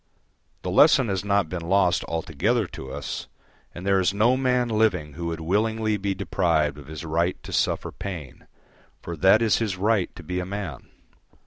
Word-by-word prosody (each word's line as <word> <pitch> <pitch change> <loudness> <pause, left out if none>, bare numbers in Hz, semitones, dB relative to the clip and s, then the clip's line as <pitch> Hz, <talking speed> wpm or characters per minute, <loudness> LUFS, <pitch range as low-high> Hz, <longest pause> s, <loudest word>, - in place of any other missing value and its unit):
The 90 - -2
lesson 130 - +5
has 95 -1 -1
not 100 -3 +1
been 90 +1 -5
lost 95 -3 +3
altogether 80 - 0
to 65 -6 -9
us, - - -5 0.5
and 90 - -7
there 100 -1 +3
is 95 +1 +1
no 115 +5 +4
man 125 -2 +1
living 105 -10 +1
who 85 +3 -5
would 80 -1 -4
willingly 110 +5 0
be 100 -1 -2
deprived 85 -6 0
of 70 - -13
his 80 +1 -7
right 85 +3 0
to - - -8
suffer - - 0
pain, 85 -10 -8 0.6
for 85 - -5
that 95 +7 +5
is 110 - +3
his 105 -5 -2
right 105 -1 +1
to 85 - -10
be 90 +3 -3
a - - -2
man. 95 -9 -6
95 Hz, 185 wpm, -25 LUFS, 85-105 Hz, 0.6 s, lesson